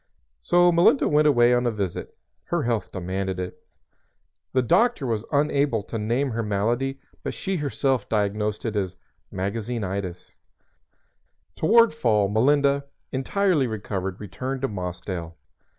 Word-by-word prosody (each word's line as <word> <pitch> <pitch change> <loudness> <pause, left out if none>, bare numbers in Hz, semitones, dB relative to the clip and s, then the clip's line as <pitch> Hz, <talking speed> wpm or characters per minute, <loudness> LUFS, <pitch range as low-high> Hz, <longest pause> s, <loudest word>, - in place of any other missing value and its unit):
So 175 0 +4
Melinda 170 +10 +4
went 150 0 +4
away 120 -4 +5
on 120 0 +2
a - - +2
visit. 100 -5 -4 0.3
Her - - -1
health 115 -4 -1
demanded 95 +1 -3
it. 90 0 -5 0.9
The 130 - +2
doctor 225 - +2
was 115 -3 -1
unable 140 -6 +1
to 115 - -5
name 120 +6 0
her 115 +1 -2
malady, 115 +6 -1 0.2
but - - -4
she 190 -1 -2
herself 135 -5 -1
diagnosed 105 0 -1
it 110 -2 -2
as 95 -3 -1 0.4
magazinitis. 100 -2 -4 1.2
Toward 230 +5 +5
fall 110 -9 +2
Melinda, 140 +5 +3 0.3
entirely 155 +1 +1
recovered, 95 -4 -4
returned 130 +7 -5
to 135 - +1
Mossdale. 90 -4 -5
115 Hz, 130 wpm, -24 LUFS, 100-140 Hz, 1.2 s, away